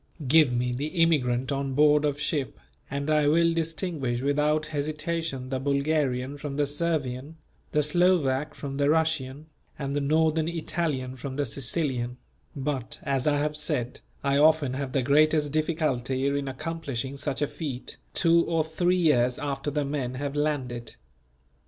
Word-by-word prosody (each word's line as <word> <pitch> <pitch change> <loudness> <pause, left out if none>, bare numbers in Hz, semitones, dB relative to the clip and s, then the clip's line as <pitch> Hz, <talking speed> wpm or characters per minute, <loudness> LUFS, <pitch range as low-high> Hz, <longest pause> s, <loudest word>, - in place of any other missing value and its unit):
] 150 - -8
Give 150 -1 +6
me 125 0 0
the 140 +5 -2
immigrant 150 -7 +2
on 135 -1 -2
board 150 +1 +5
of 145 -1 -1
ship, 145 -3 -2 0.3
and 140 +1 -3
I 150 -1 +3
will 165 +2 +4
distinguish 160 -6 -2
without 150 +3 +1
hesitation 155 -2 -3
the 130 -1 -1
Bulgarian 140 -1 0
from 140 -1 -5
the 145 - +3
Servian, 145 -1 -2 0.3
the 150 - +2
Slovak 150 -3 +2
from 140 -1 -5
the 140 0 +2
Russian, 155 -3 0 0.3
and 140 -1 -3
the 145 - +1
Northern 160 +2 +2
Italian 155 -6 -2
from 130 +1 -6
the 145 0 0
Sicilian; 125 -1 -2 0.4
but 135 -3 -3
as 135 -2 0
I 145 -1 +3
have 150 +1 -1
said, 150 -5 -2 0.2
I 140 0 +2
often 150 -3 +4
have 135 -1 -4
the 135 - +1
greatest 150 +2 +3
difficulty 140 -5 0
in 140 0 0
accomplishing 140 -2 -4
such 140 +1 -2
a - - +1
feat, 135 -6 -6 0.2
two 170 -1 +4
or 165 -2 +2
three 175 +3 +1
years 125 -8 +3
after 145 0 -3
the 145 0 -1
men 135 -3 -3
have 140 +2 -3
landed. 130 -6 -2
145 Hz, 160 wpm, -27 LUFS, 130-155 Hz, 0.4 s, Give